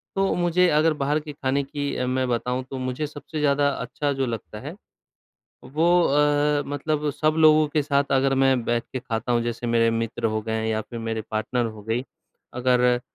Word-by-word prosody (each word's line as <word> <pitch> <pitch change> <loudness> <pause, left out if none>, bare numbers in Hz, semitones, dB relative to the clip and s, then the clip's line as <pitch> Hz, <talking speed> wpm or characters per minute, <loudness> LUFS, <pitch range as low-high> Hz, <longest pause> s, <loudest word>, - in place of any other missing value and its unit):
तो 195 0 +1
मुझे 175 +1 +3
अगर 155 +1 +3
बाहर 145 +1 0
के 150 0 -8
खाने 140 0 -1
की 140 0 -4
अ, 125 - -1
मैं 130 0 0
बताऊँ 125 +2 -1
तो 135 - -5
मुझे 130 +3 -3
सबसे 150 +1 -7
ज़्यादा 145 -1 +3
अच्छा 140 +2 -3
जो 135 -1 -1
लगता 115 -3 -6
है 145 +9 -8 0.9
वो 150 +6 -1 0.2
अ, 145 0 +2
मतलब 150 +1 -1
सब 155 +2 0
लोगों 155 -1 +6
के 150 0 0
साथ 140 -1 0
अगर 135 0 +3
मैं 130 -3 +3
बैठ 120 0 0
के 130 - -2
खाता 120 -1 -3
हूँ, 120 - +2
जैसे 120 0 -3
मेरे 115 0 +3
मित्र 115 0 -2
हो 110 -1 0
गए 110 0 -2
या 110 0 0
फिर 115 +1 -8
मेरे 115 -1 -3
पार्टनर 110 +3 -1
हो 110 -2 -7
गई, 115 +3 -1 0.5
अगर 125 0 +2
135 Hz, 195 wpm, -24 LUFS, 120-150 Hz, 0.9 s, लोगों